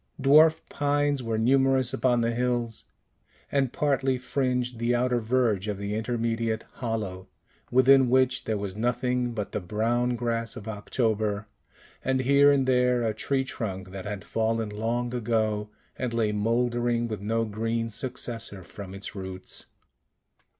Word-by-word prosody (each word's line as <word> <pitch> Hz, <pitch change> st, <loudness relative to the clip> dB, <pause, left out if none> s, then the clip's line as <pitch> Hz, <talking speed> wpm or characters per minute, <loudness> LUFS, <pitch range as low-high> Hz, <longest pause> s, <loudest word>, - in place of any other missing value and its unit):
Dwarf 155 Hz, +4 st, +6 dB
pines 145 Hz, -1 st, +1 dB
were 115 Hz, -2 st, -2 dB
numerous 130 Hz, +2 st, +3 dB
upon 120 Hz, -2 st, +2 dB
the 115 Hz, 0 st, +1 dB
hills, 120 Hz, -2 st, -1 dB, 0.7 s
and 135 Hz, -3 st, +1 dB
partly 135 Hz, -3 st, +1 dB
fringed 125 Hz, -2 st, -1 dB
the 120 Hz, +1 st, +1 dB
outer 125 Hz, 0 st, +1 dB
verge 110 Hz, -4 st, +1 dB
of 105 Hz, -2 st, -2 dB
the 100 Hz, +1 st, -3 dB
intermediate 115 Hz, 0 st, -1 dB
hollow, 105 Hz, -6 st, -4 dB, 0.4 s
within 130 Hz, 0 st, +5 dB
which 130 Hz, 0 st, +2 dB
there 110 Hz, -1 st, 0 dB
was 100 Hz, -2 st, -4 dB
nothing 120 Hz, +2 st, 0 dB
but 105 Hz, -3 st, -4 dB
the -, -, -2 dB
brown 115 Hz, +6 st, 0 dB
grass 115 Hz, -1 st, -2 dB
of 105 Hz, -, -9 dB
October, 110 Hz, -1 st, -1 dB, 0.6 s
and 130 Hz, 0 st, +1 dB
here 140 Hz, +2 st, +5 dB
and 135 Hz, -2 st, +2 dB
there 125 Hz, -1 st, +3 dB
a 110 Hz, -1 st, 0 dB
tree 135 Hz, +5 st, 0 dB
trunk 95 Hz, -7 st, -5 dB
that 95 Hz, -1 st, -7 dB
had 105 Hz, -3 st, -5 dB
fallen 115 Hz, -1 st, 0 dB
long 115 Hz, +3 st, -2 dB
ago, 110 Hz, -3 st, 0 dB, 0.3 s
and 125 Hz, -2 st, -2 dB
lay 110 Hz, -2 st, +2 dB
mouldering 120 Hz, +2 st, +1 dB
with 110 Hz, -3 st, -5 dB
no 115 Hz, +2 st, 0 dB
green 115 Hz, +2 st, -2 dB
successor 115 Hz, -4 st, -6 dB
from 95 Hz, +1 st, -9 dB
its 100 Hz, -, -7 dB
roots. 95 Hz, -2 st, -7 dB
115 Hz, 145 wpm, -27 LUFS, 110-125 Hz, 0.7 s, Dwarf